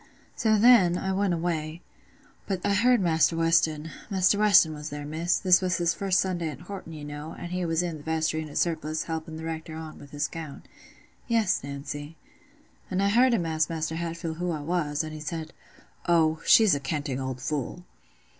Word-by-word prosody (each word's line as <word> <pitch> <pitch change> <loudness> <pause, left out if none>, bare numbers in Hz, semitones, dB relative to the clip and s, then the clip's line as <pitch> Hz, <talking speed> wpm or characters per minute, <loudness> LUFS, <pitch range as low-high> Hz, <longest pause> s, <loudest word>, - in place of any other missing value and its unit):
"So 220 -2 +2
then, 205 -6 +6
I 190 +1 -2
went 195 -2 +1
away. 165 -1 -3 0.6
But 190 -3 -3
I 200 - +2
heard 240 +3 +4
Maister 165 -1 +3
Weston—Maister 165 +4 +1
Weston 200 -7 +5
was 150 0 -7
there, 145 0 -6
Miss—this 175 +4 +2
was 180 -2 0
his 170 -1 +1
first 190 -2 +1
Sunday 175 -4 -1
at 145 -2 -9
Horton, 180 -2 -8
you 150 -2 -8
know, 145 +2 -7
an' 175 - -7
he 180 0 -2
was 165 +1 +1
i' 175 - -2
th' 155 -2 -9
vestry 160 0 -1
in 155 - -6
his 145 - -7
surplice, 160 -2 -1
helping 160 -1 -5
th' 160 - -8
Rector 160 -1 -5
on 160 -1 -8
with 140 - -13
his 145 +1 -2
gown—" 160 -4 -8 0.6
"Yes, 225 - +1
Nancy." 145 +2 -7 0.7
"And 190 +1 0
I 200 - +3
heard 240 +3 +4
him 175 -6 -1
ask 160 -1 0
Maister 160 -1 -3
Hatfield 165 -1 -4
who 180 +1 -2
I 155 -3 -2
was, 150 -2 -1
an' 155 - -6
he 155 - -7
says, 160 +1 -5 0.6
'Oh, 160 -2 +3
she's 220 -3 +7
a 140 - +1
canting 140 -2 -3
old 130 -1 -4
fool. 150 +6 -4
165 Hz, 190 wpm, -27 LUFS, 155-180 Hz, 0.7 s, she's